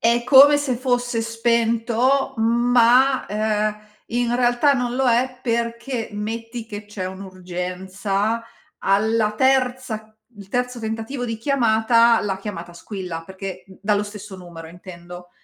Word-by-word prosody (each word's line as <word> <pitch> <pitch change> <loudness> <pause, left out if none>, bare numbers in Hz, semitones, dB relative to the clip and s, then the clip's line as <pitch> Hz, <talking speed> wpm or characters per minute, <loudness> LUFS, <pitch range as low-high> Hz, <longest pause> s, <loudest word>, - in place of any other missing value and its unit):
è 235 +1 +3
come 280 +3 +8
se 270 -4 -1
fosse 245 -2 0
spento, 235 +3 +1
ma, 240 +3 +3
uhm, 215 0 0 0.3
in 240 0 0
realtà 245 +3 +3
non 245 -2 -1
lo 265 0 +2
è 250 +2 +1
perché 235 0 -2
metti 225 +2 -5
che 210 -1 -7
c'è 205 -2 -6
un'urgenza, 190 +3 -3 0.3
alla 215 +2 +1
terza 250 -3 0 0.2
il 200 -1 -12
terzo 250 +1 -2
tentativo 225 +3 -4
di 230 -1 -3
chiamata, 230 -2 +3
la 195 -2 -2
chiamata 175 -4 -7
squilla, 180 -2 -6
perché 190 -1 -7
d 190 - -16
dallo 205 0 +1
stesso 205 -1 -9
numero 170 -3 -10
intendo. 175 0 -11
225 Hz, 130 wpm, -22 LUFS, 200-245 Hz, 0.3 s, come